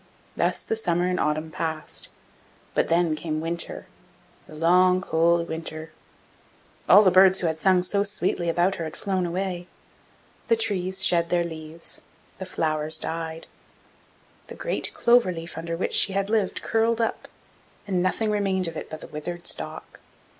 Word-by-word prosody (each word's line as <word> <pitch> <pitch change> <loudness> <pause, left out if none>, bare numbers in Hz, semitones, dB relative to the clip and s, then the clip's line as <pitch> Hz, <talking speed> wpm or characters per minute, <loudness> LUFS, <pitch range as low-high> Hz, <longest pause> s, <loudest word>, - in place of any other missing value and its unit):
Thus - - 0
the - - -2
summer 175 -5 +1
and 180 0 0
autumn 155 +1 -1
passed, 160 -1 -4 0.6
but - - +1
then 165 -1 +2
came 155 0 -3
winter 170 +1 -2 0.6
the 155 - -12
long, 180 +3 +4
cold 170 -1 +2
winter. 160 0 -6 1.0
All 205 +3 +9
the 185 - +5
birds 190 +1 +6
who - - -1
had 160 -1 -1
sung 185 0 +3
so 200 +2 +1
sweetly 185 -4 0
about 175 +3 +1
her 165 - -3
had 160 - -7
flown 190 -3 -1
away; 180 0 -3 0.8
the 230 - +4
trees 190 -4 +1
shed 170 -1 +3
their 175 -1 +2
leaves, 160 0 -5 0.4
the 190 - -6
flowers 155 0 +1
died; 165 0 -4 1.0
the - - -9
great - - -1
clover 235 -5 +4
leaf 165 -1 -7
under 165 +1 -4
which - - -2
she 195 - +3
had 195 +1 -1
lived 215 -4 0
curled 225 +1 +1
up, 225 -1 -2 0.6
and 185 -3 0
nothing 210 +4 0
remained 195 -3 0
of 165 - -6
it - - -6
but 155 - -8
the - - -8
withered 175 +3 -6
stalk. - - -3
175 Hz, 160 wpm, -25 LUFS, 165-190 Hz, 1.0 s, All